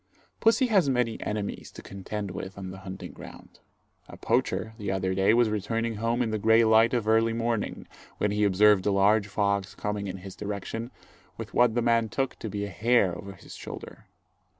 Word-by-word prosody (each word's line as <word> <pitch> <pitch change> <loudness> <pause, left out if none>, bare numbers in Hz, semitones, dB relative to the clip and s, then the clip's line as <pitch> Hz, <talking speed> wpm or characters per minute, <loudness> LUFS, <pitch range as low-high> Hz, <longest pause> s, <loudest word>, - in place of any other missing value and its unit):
Pussy 230 +4 +4
has 195 - +3
many 125 -3 0
enemies 105 -1 -4
to - - -12
contend 100 +1 -6
with 95 +1 -7
on 95 -2 -6
the 95 - -9
hunting 95 0 -8
ground. - - -13 0.5
A - - -11
poacher, 110 - 0
the 100 -2 -3
other 95 -1 -1
day, 95 +2 +3
was 120 +1 +4
returning 115 +2 -2
home 115 +3 0
in 110 - -2
the 110 - -1
grey 110 +2 +5
light 115 +2 +4
of 115 -3 -1
early 115 +1 +3
morning, 115 -2 -2 0.3
when 105 - 0
he 105 0 +1
observed 105 0 +4
a - - +3
large 100 +2 +3
fox 100 -1 -1
coming 105 -1 -3
in 95 0 -5
his 95 0 -10
direction, 105 +3 -5 0.5
with - - -8
what 120 -2 +3
the 120 - +1
man 115 -1 +2
took 135 +2 -2
to 110 - -5
be 100 0 -3
a - - -6
hare 100 -1 +2
over 100 +3 -8
his 95 - -13
shoulder. - - -9
105 Hz, 195 wpm, -27 LUFS, 100-115 Hz, 0.5 s, grey